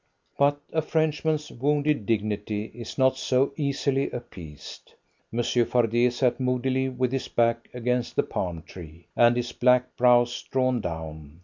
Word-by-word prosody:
But 145 +1 +2
a 160 - +2
Frenchman's 155 -1 0
wounded 145 -3 0
dignity 105 -1 -2
is 120 -1 -8
not 130 -1 +3
so 135 +1 +1
easily 140 -1 0
appeased. 85 -12 -10 0.4
Monsieur 120 +1 +1
Fardet 120 +1 +2
sat 125 0 +1
moodily 130 +1 0
with 125 -1 -1
his 135 -1 -2
back 115 0 +1
against 125 0 -2
the - - +3
palm 85 -3 -4
tree, 85 -1 -12
and 120 0 +5
his 120 0 -2
black 125 0 +2
brows 120 -1 +4
drawn 130 -2 0
down. 80 -3 -7
125 Hz, 140 wpm, -26 LUFS, 110-130 Hz, 0.4 s, and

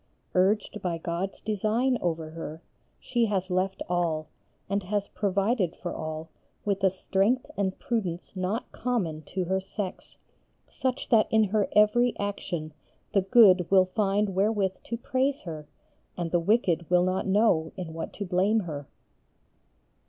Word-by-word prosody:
Urged 205 +3 +1
by 175 -2 -1
God's 170 +3 -4
design 220 +5 +1
over 160 -2 -2
her 160 0 -7 0.4
she 240 -2 +1
has 190 -3 -1
left 185 +1 0
all, 170 -3 0 0.4
and 200 +1 0
has 200 +1 -2
provided 200 -1 0
for 175 - -5
all 155 0 -5 0.4
with 200 -1 -1
a 190 - +6
strength 195 +6 +1
and 195 -2 -1
prudence 190 -7 -3
not 190 +6 -2
common 185 -12 -2
to 185 +5 -3
her 190 +2 +1
sex, 190 0 -6 0.5
such 260 0 -3
that 225 -3 +5
in 220 0 +4
her 210 0 +1
every 235 +3 +4
action 175 -6 -4 0.4
the 195 - +4
good 190 -3 +6
will 190 -1 +6
find 200 +1 0
wherewith 195 0 +1
to 235 - -3
praise 265 +3 0
her 155 -4 -7 0.5
and 170 -2 -3
the 175 - +3
wicked 175 -3 +1
will 180 0 +4
not 185 +2 0
know 190 -6 +3
in 175 -4 -5
what 165 0 -5
to 205 - -5
blame 195 +5 +2
her." 145 -6 -6
190 Hz, 150 wpm, -27 LUFS, 175-210 Hz, 0.5 s, a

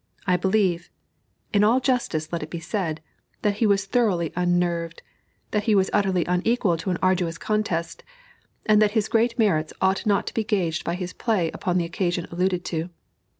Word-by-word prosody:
I 180 -3 +3
believe 185 -2 +1 0.6
in 205 0 +4
all 230 +5 +4
justice 240 - -1
let 170 - -1
it 155 - -6
be 170 - -5
said 165 -3 -3 0.4
that 205 -1 +1
he 225 - +2
was 200 -1 +2
thoroughly 195 -7 +1
unnerved, 175 -1 0 0.5
that 210 -1 0
he 220 - +3
was 190 -1 +2
utterly 190 -4 +2
unequal 180 +1 +1
to 165 - -4
an 180 - 0
arduous 180 -3 +1
contest, 195 -6 -2 0.6
and 215 0 +4
that 210 -1 +3
his 215 - +1
great 235 +1 +1
merits 175 -9 +1
ought 190 +3 +1
not 200 -1 +2
to - - -5
be 225 - 0
gauged 180 -7 -1
by 170 - -2
his 180 0 -5
play 195 -8 0
upon 180 -2 -1
the 175 - +1
occasion 175 0 -2
alluded 180 +1 0
to. 165 0 -3
185 Hz, 185 wpm, -24 LUFS, 170-210 Hz, 0.6 s, in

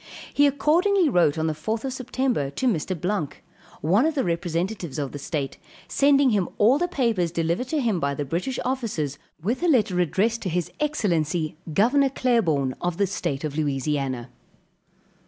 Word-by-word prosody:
He 290 0 +5
accordingly 335 +6 +3
wrote 170 - +3
on 160 - 0
the 160 - 0
4th 220 - -3
September 255 - -1
to 140 - -4
Mr. 185 -4 -1
Blanque, 180 -4 -2 0.4
one 195 - +3
of 320 - -1
the 270 - +1
representatives 170 0 -2
of 140 -3 -2
the 145 - -7
state, 140 -1 -4 0.3
sending 280 -2 +4
him 200 -5 +1
all 240 +7 +4
the 350 - +1
papers 230 - 0
delivered 170 +8 -1
to 310 +3 0
him 225 -9 +1
by 140 -2 -1
the 145 - -3
British 180 - -2
officers 210 - -2 0.2
with 235 - -1
a 355 - +2
letter 215 - +3
addressed 210 +7 +1
to 190 - -2
his 175 0 -2
excellency, 170 - 0
Gov. 260 - +3
Claiborne 165 - +2
of 175 -1 -1
the 200 - +3
state 170 -7 -3
of 150 -2 -3
Louisiana. 135 -4 -1
185 Hz, 170 wpm, -24 LUFS, 155-255 Hz, 0.4 s, He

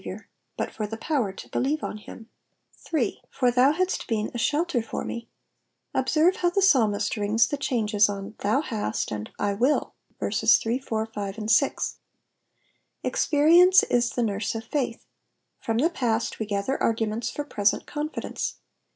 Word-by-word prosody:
iour, - - -8 0.3
but - - -2
for 215 - -4
the 220 +1 -6
power 250 -5 -1
to 190 - -11
believe 290 +4 -1
on - - -4
him. 220 +1 -12 0.6
8. 265 -10 0
'''For 250 -2 +2
Hum 260 +4 +5
liant 370 +2 -1
leen 215 -2 -1
a - - -4
shelter 300 0 +1
for 225 - -5
mey 235 0 -5 0.7
Observe 310 +7 +2
how 350 - +2
the 355 - 0
psalmist 220 - +3
rings 210 +2 +3
the - - -2
changes 215 -6 +2
on, 200 +1 -5
^'Tlwu 220 +9 +1
lutut,'^ 210 - -2
and 105 0 -6
*'/ - - -37
m//,'' 215 +8 +1 0.3
*verses - - +4
3, 235 +3 -1
4, 220 -4 -2
5, 205 -2 -6
and 215 0 -2
6. 275 +5 +2 1.1
Experience 340 +5 +5
is 240 0 +1
the 245 - -1
nurse 210 0 -2
of 225 - -4
failh. 250 -5 -2 0.6
From 225 -1 -2
the 315 +8 +2
past 235 -7 -1
we 220 - -3
gather 205 +6 -1
arguments 225 0 0
for 290 - -4
present 205 -7 0
con 300 0 -3
fidence. - - -4
230 Hz, 170 wpm, -25 LUFS, 210-285 Hz, 1.1 s, Hum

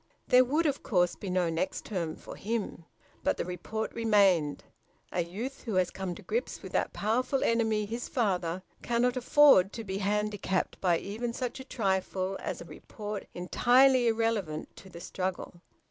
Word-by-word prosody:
There 250 0 +7
would 300 +7 +1
of 285 -2 0
course 180 -4 +2
be 195 - -6
no 180 -2 +1
"next 165 +3 -2
term" 170 -6 -3
for - - -10
him, 210 -6 -3 0.4
but - - +1
the - - -2
report 180 +5 -4
remained. 195 -10 +3 0.5
A 175 - 0
youth 225 +11 -6
who 225 -6 -4
has 185 -1 +2
come 190 -2 -4
to - - -12
grips 470 +3 -3
with - - -8
that - - 0
powerful 250 +6 0
enemy, 220 -2 +2
his 230 +4 -5
father, 185 - 0 0.2
cannot 240 +1 +1
afford 255 -6 +6
to 225 - -5
be 195 -1 -4
handicapped 205 -1 -1
by 175 -3 +3
even 230 +6 -4
such 250 +1 -4
a - - -6
trifle 195 -5 -1
as - - -4
a - - -8
report 210 -2 -7
entirely 245 +7 +4
irrelevant 225 -9 -1
to 190 - -12
the 170 - -10
struggle. 180 -1 -4
210 Hz, 170 wpm, -29 LUFS, 185-235 Hz, 0.5 s, There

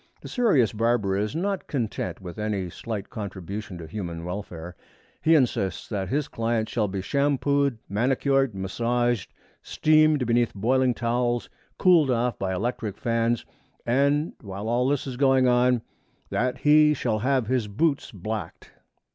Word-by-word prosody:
The - - -9
serious 195 - +2
barber 110 -3 +1
is 105 +7 -1
not 195 +3 -2
content 110 - -3
with 90 +1 -8
any 100 -4 -2
slight 110 0 -6
contribution 100 -1 -6
to 85 - -8
human 85 -2 -6
welfare. 90 -2 -6 0.5
He 165 +1 +5
insists 105 - 0
that 95 -4 -3
his 145 +3 0
client 115 -3 -1
shall 110 -3 0
be 95 -1 -4
shampooed, 140 0 +1
manicured, 135 +3 +1
massaged, 120 +4 -1 0.3
steamed 155 -3 +3
beneath 120 -1 +1
boiling 125 +4 +2
towels, 120 0 -1 0.3
cooled 170 -6 +5
off 120 0 0
by 95 -1 -1
electric 105 +1 -3
fans 115 -2 0 0.4
and, 140 +5 +2
while 100 0 -6
all 120 +2 +1
this 140 -1 0
is 130 -3 -5
going 135 -1 +4
on, 125 -1 +3 0.5
that 125 +1 0
he 150 0 +5
shall 115 -5 -1
have 130 +1 +1
his 120 -1 0
boots 140 +8 0
blacked. 110 +2 -6
120 Hz, 145 wpm, -25 LUFS, 105-135 Hz, 0.5 s, He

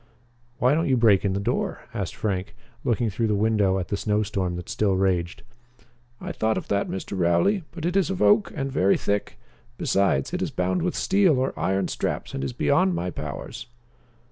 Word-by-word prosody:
"Why 125 +3 +3
don't 160 0 +1
you 130 - +3
break 110 -5 +4
in 100 -2 +1
the 100 - -1
door?" 100 - -2
asked - - -4
Frank, 95 -3 -3 0.3
looking 115 -2 0
through 115 +4 0
the 105 - +1
window 105 -2 +2
at 90 -2 -4
the - - 0
snow 105 +1 0
storm 95 -4 -2
that 90 0 -7
still 100 -3 +1
raged. 90 -3 0 0.8
"I - - -5
thought 110 0 0
of - - -5
that, 100 0 0
Mr. 95 +1 -5
Rowley, 150 - +2
but 165 -2 -6
it 175 +2 -1
is 195 -2 +2
of 190 -1 -3
oak 210 -1 +4
and 135 -3 -3
very 100 -7 +3
thick. 100 0 -2 0.4
Besides, 100 - +1
it - - -2
is - - -1
bound 90 0 -1
with 180 - -1
steel 190 -7 +3
or 130 +1 0
iron 95 +4 0
straps - - -3
and 70 - -3
is 70 - -2
beyond 90 +8 +2
my 90 +2 -2
powers." 75 - -7
100 Hz, 200 wpm, -25 LUFS, 95-130 Hz, 0.8 s, break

